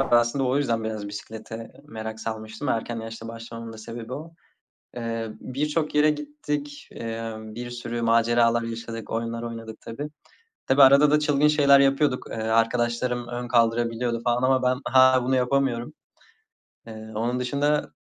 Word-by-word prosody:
Ben 135 Hz, -3 st, +4 dB
aslında 120 Hz, +3 st, +2 dB
o 130 Hz, +2 st, +1 dB
yüzden 115 Hz, -6 st, 0 dB
biraz 110 Hz, -2 st, -4 dB
bisiklete 110 Hz, +2 st, -8 dB
merak 110 Hz, 0 st, -7 dB
salmıştım. 110 Hz, +4 st, -5 dB
Erken 115 Hz, 0 st, -1 dB
yaşta 115 Hz, 0 st, -8 dB
başlamamın 115 Hz, 0 st, -8 dB
da 110 Hz, -, -11 dB
sebebi 115 Hz, +2 st, -8 dB
o. 160 Hz, +4 st, -7 dB, 0.6 s
Eee, 115 Hz, -1 st, -3 dB
birçok 150 Hz, +4 st, -2 dB
yere 150 Hz, +1 st, +5 dB
gittik, 150 Hz, -1 st, -5 dB
emm, 115 Hz, -1 st, -6 dB
bir 120 Hz, +1 st, -6 dB
sürü 120 Hz, -1 st, -4 dB
maceralar 115 Hz, 0 st, +3 dB
yaşadık, 115 Hz, -1 st, -6 dB
oyunlar 115 Hz, 0 st, -3 dB
oynadık 115 Hz, -1 st, -7 dB
tabii. 145 Hz, +6 st, -6 dB, 0.6 s
Tabii 135 Hz, +2 st, +5 dB
arada 140 Hz, +2 st, +7 dB
da 150 Hz, -, +5 dB
çılgın 150 Hz, 0 st, +3 dB
şeyler 140 Hz, -2 st, +6 dB
yapıyorduk. 135 Hz, -1 st, +2 dB
Eee, -, -, -5 dB
arkadaşlarım 120 Hz, +2 st, 0 dB
ön 120 Hz, 0 st, -4 dB
kaldırabiliyordu 115 Hz, 0 st, +1 dB
falan 120 Hz, +1 st, +1 dB
ama 130 Hz, 0 st, +3 dB
ben 130 Hz, +1 st, +1 dB
hâlâ 130 Hz, 0 st, +5 dB
bunu 130 Hz, +1 st, +2 dB
yapamıyorum. 125 Hz, -2 st, 0 dB, 1.0 s
Eee, 110 Hz, 0 st, -9 dB
onun 120 Hz, +3 st, -1 dB
dışında 145 Hz, +4 st, 0 dB
120 Hz, 150 wpm, -25 LUFS, 115-135 Hz, 1.0 s, arada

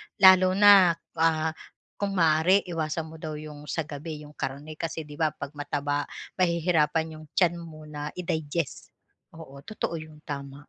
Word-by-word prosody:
Lalo 185 Hz, -2 st, +7 dB
na, 195 Hz, -4 st, +7 dB, 0.2 s
ah, 160 Hz, -1 st, +2 dB, 0.5 s
kung 200 Hz, -1 st, -1 dB
maaari 165 Hz, +3 st, +4 dB
iwasan 160 Hz, -2 st, -3 dB
mo 160 Hz, -, -11 dB
daw 155 Hz, -1 st, -5 dB
'yong 150 Hz, -1 st, -9 dB
sa 165 Hz, -, -1 dB
gabi 150 Hz, +1 st, -7 dB
'yong 150 Hz, -, -12 dB
karne 145 Hz, +4 st, -5 dB
kasi, 160 Hz, -1 st, -3 dB
'di 150 Hz, +1 st, -12 dB
ba, 155 Hz, -2 st, +1 dB
'pag 140 Hz, 0 st, -6 dB
mataba 145 Hz, 0 st, -2 dB, 0.3 s
mahihirapan 160 Hz, -2 st, +1 dB
'yong 155 Hz, -, -12 dB
tiyan 175 Hz, -2 st, +3 dB
mo 155 Hz, -2 st, -10 dB
na 150 Hz, -1 st, -6 dB
i-digest. 160 Hz, -3 st, -3 dB, 0.5 s
Oo, 140 Hz, -4 st, -11 dB
totoo 170 Hz, -1 st, -4 dB
'yon 155 Hz, -1 st, -12 dB
tama. 140 Hz, -2 st, -6 dB
155 Hz, 155 wpm, -27 LUFS, 150-170 Hz, 0.5 s, Lalo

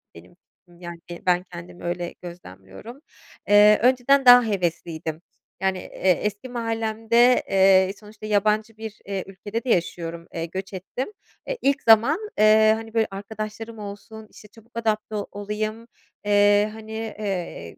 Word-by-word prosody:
benim 85 Hz, -, -15 dB
fikrim 175 Hz, -1 st, -26 dB
yani 175 Hz, -1 st, -8 dB, 0.3 s
ben 180 Hz, 0 st, +2 dB
kendimi 175 Hz, 0 st, -10 dB
öyle 175 Hz, 0 st, -3 dB
gözlemliyorum. 175 Hz, -, -11 dB, 0.5 s
Eee, 210 Hz, +1 st, +6 dB
önceden 260 Hz, +2 st, +3 dB
daha 245 Hz, 0 st, +9 dB
hevesliydim. 170 Hz, -5 st, -3 dB, 0.4 s
Yani, 190 Hz, -1 st, 0 dB
eee, 185 Hz, +1 st, -1 dB
eski 210 Hz, +4 st, -4 dB
mahallemde, 230 Hz, +1 st, +2 dB
eee, 190 Hz, 0 st, +4 dB
sonuçta 215 Hz, 0 st, -12 dB
yabancı 215 Hz, +1 st, 0 dB
bir, 220 Hz, -1 st, -8 dB
eee, 195 Hz, -1 st, -3 dB
ülkede 205 Hz, +4 st, -6 dB
de 255 Hz, -, -5 dB
yaşıyorum, 170 Hz, -3 st, -2 dB
eee, 165 Hz, -1 st, -3 dB
göç 190 Hz, +4 st, -7 dB
ettim. 195 Hz, -, -5 dB, 0.4 s
Eee, -, -, -3 dB
ilk 275 Hz, 0 st, +1 dB
zaman, 230 Hz, -, +5 dB, 0.2 s
eee, 215 Hz, 0 st, +6 dB
hani, 225 Hz, 0 st, -9 dB
böyle, 225 Hz, -1 st, +2 dB
arkadaşlarım 215 Hz, +3 st, -7 dB
olsun, 215 Hz, +2 st, -9 dB
işte, 210 Hz, -, -15 dB
çabuk 225 Hz, +2 st, -20 dB
adapte 215 Hz, -1 st, -1 dB, 0.2 s
olayım, 215 Hz, +3 st, -5 dB, 0.4 s
eee, 205 Hz, 0 st, +4 dB
hani, 220 Hz, 0 st, -11 dB
eee, 205 Hz, -, -5 dB
210 Hz, 140 wpm, -23 LUFS, 185-225 Hz, 0.5 s, daha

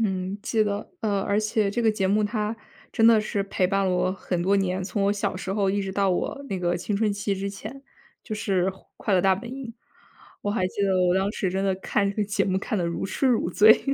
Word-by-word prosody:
嗯， 190 Hz, -2 st, -1 dB
记 225 Hz, -1 st, +1 dB
得， 205 Hz, -1 st, -3 dB
呃， 200 Hz, -3 st, 0 dB
而 200 Hz, +1 st, +1 dB
且 215 Hz, -1 st, +1 dB
这 235 Hz, +4 st, -1 dB
个 225 Hz, -, +4 dB
节 205 Hz, -3 st, 0 dB
目 205 Hz, +3 st, +2 dB
它 210 Hz, +1 st, -1 dB, 0.4 s
真 225 Hz, -, +2 dB
的 225 Hz, -2 st, +7 dB
是 210 Hz, -1 st, -2 dB
陪 190 Hz, -2 st, 0 dB
伴 195 Hz, +1 st, +1 dB
了 190 Hz, -, +1 dB
我 180 Hz, 0 st, +1 dB
很 185 Hz, -2 st, -3 dB
多 195 Hz, +3 st, +3 dB
年， 190 Hz, -1 st, 0 dB
从 190 Hz, +2 st, -2 dB
我 200 Hz, -, +3 dB
小 200 Hz, -2 st, -2 dB
时 190 Hz, 0 st, -4 dB
候 200 Hz, -1 st, +1 dB
一 200 Hz, +1 st, 0 dB
直 195 Hz, -, -4 dB
到 195 Hz, 0 st, +1 dB
我 185 Hz, +9 st, -2 dB
那 195 Hz, -, -2 dB
个 175 Hz, -1 st, 0 dB
青 200 Hz, +4 st, -2 dB
春 210 Hz, 0 st, +1 dB
期 200 Hz, 0 st, -1 dB
之 195 Hz, +1 st, -3 dB
前， 215 Hz, +7 st, -9 dB, 0.4 s
就 215 Hz, -, -5 dB
是 190 Hz, -3 st, 0 dB, 0.3 s
《快 210 Hz, -, -2 dB
乐 185 Hz, -, +4 dB
大 190 Hz, +1 st, +4 dB
本 235 Hz, +5 st, -8 dB
营》。 270 Hz, -1 st, -6 dB, 0.8 s
我 205 Hz, -, -1 dB
还 195 Hz, -4 st, 0 dB
记 200 Hz, -, -3 dB
得 190 Hz, -1 st, +2 dB
我 175 Hz, -, +3 dB
当 190 Hz, +1 st, +1 dB
时 190 Hz, -, -1 dB
真 190 Hz, +2 st, -1 dB
的 195 Hz, -1 st, +2 dB
看 200 Hz, +1 st, 0 dB
这 200 Hz, -, -3 dB
个 210 Hz, -, +1 dB
节 205 Hz, 0 st, 0 dB
目 190 Hz, -1 st, 0 dB
看 210 Hz, +2 st, -2 dB
得 175 Hz, -, 0 dB
如 170 Hz, -, -3 dB
痴 195 Hz, +8 st, -1 dB
如 235 Hz, -8 st, +2 dB
醉。 215 Hz, +4 st, +6 dB
200 Hz, 275 characters per minute, -25 LUFS, 190-215 Hz, 0.8 s, 的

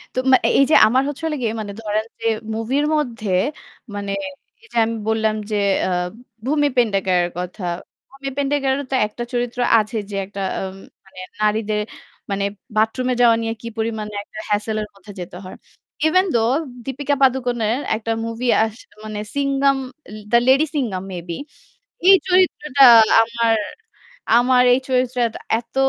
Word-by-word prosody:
তো -, -, +1 dB
মা -, -, +9 dB
এ -, -, +3 dB
এইযে 275 Hz, +3 st, +4 dB
আমার 255 Hz, +4 st, +3 dB
হচ্ছে 290 Hz, +2 st, -6 dB
হলো 315 Hz, -1 st, -1 dB
গিয়ে 225 Hz, -2 st, -1 dB
মানে 205 Hz, -1 st, -6 dB
ধরেন 215 Hz, 0 st, -1 dB
যে -, -, -8 dB, 0.3 s
মুভির 245 Hz, +7 st, 0 dB
মধ্যে 235 Hz, -8 st, -2 dB, 0.7 s
মানে 200 Hz, -1 st, -4 dB, 0.5 s
এইযে 460 Hz, -, -9 dB
আমি 230 Hz, +1 st, -3 dB
বললাম 220 Hz, -1 st, +1 dB, 0.2 s
যে -, -, 0 dB, 0.3 s
অ্যাঁ 180 Hz, -1 st, 0 dB, 0.4 s
ভূমি 290 Hz, +2 st, +2 dB
পেডনেকারের 195 Hz, -6 st, +2 dB
কথা। 180 Hz, +3 st, -6 dB, 0.5 s
ভূমি 275 Hz, 0 st, -7 dB
পেডনেকারেরও 280 Hz, -1 st, 0 dB
তো -, -, +1 dB
একটা 225 Hz, +3 st, -7 dB
চরিত্র 245 Hz, 0 st, -2 dB, 0.2 s
আছে 215 Hz, +2 st, -3 dB
যে 200 Hz, -, -6 dB
একটা 200 Hz, +1 st, -7 dB, 0.2 s
আম 190 Hz, 0 st, -5 dB, 0.3 s
মানে 190 Hz, -1 st, -14 dB, 0.2 s
নারীদের 215 Hz, 0 st, +1 dB, 0.5 s
মানে 200 Hz, 0 st, -1 dB, 0.3 s
বাথরুমে 235 Hz, +4 st, +1 dB
যাওয়া 235 Hz, -2 st, +6 dB
নিয়ে 225 Hz, 0 st, -2 dB
কি 235 Hz, -, -7 dB
পরিমাণে 220 Hz, -1 st, -3 dB
একটা 215 Hz, -, -11 dB
hassle 210 Hz, +1 st, 0 dB
এর 210 Hz, -, -5 dB
মধ্যে 195 Hz, +1 st, -13 dB
যেতে 175 Hz, 0 st, -8 dB
হয়। 185 Hz, -, -9 dB, 0.5 s
Even 370 Hz, +4 st, +3 dB
though 230 Hz, +1 st, +2 dB, 0.3 s
দীপিকা 280 Hz, +2 st, -1 dB
পাদুকনের 245 Hz, -3 st, +1 dB, 0.2 s
একটা 225 Hz, +1 st, -3 dB
মুভি 230 Hz, +2 st, -4 dB, 0.2 s
আস 220 Hz, -1 st, -3 dB, 0.3 s
মানে 215 Hz, -1 st, -5 dB, 0.2 s
সিঙ্গাম 275 Hz, -1 st, +2 dB, 0.3 s
আ -, -, -11 dB, 0.2 s
the 235 Hz, -, +6 dB
lady 275 Hz, +4 st, +5 dB
Singham 215 Hz, -10 st, -2 dB
may 180 Hz, -, -4 dB
be. 170 Hz, -, -3 dB, 0.7 s
এই 390 Hz, -, +10 dB
চরিত্রটা 300 Hz, -7 st, +3 dB, 0.4 s
আমার 230 Hz, -1 st, +1 dB, 0.8 s
আমার 250 Hz, +1 st, +4 dB
এই 255 Hz, -, 0 dB
চরিত্রটা 250 Hz, -3 st, 0 dB, 0.2 s
এত 235 Hz, -, -26 dB
230 Hz, 155 wpm, -20 LUFS, 215-265 Hz, 0.8 s, এই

